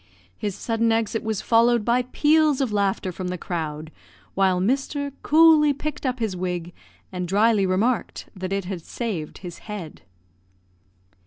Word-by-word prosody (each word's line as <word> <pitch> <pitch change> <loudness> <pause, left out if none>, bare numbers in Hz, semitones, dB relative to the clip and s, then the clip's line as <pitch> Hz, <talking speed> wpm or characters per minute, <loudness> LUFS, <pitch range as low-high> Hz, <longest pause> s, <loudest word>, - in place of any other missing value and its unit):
His 205 - -4
sudden 230 0 0
exit 225 0 0
was 220 -2 -3
followed 235 -1 +3
by 240 +1 +3
peals 305 -2 +3
of 265 -5 0
laughter 195 -2 0
from 180 +1 -5
the 180 0 -3
crowd, 155 -3 -5 0.4
while 190 -2 +2
Mr. 275 +7 -1
coolly 310 -1 +5
picked 295 0 -4
up 255 0 -1
his 220 -6 -2
wig, 175 -1 -4 0.4
and 180 -1 -4
drily 205 +1 +3
remarked 220 +7 -1
that 185 0 -5
it 195 -1 -1
had 180 -2 -5
saved 180 -5 -5
his 175 -1 -8
head. 190 -7 -7
210 Hz, 150 wpm, -24 LUFS, 185-245 Hz, 0.4 s, coolly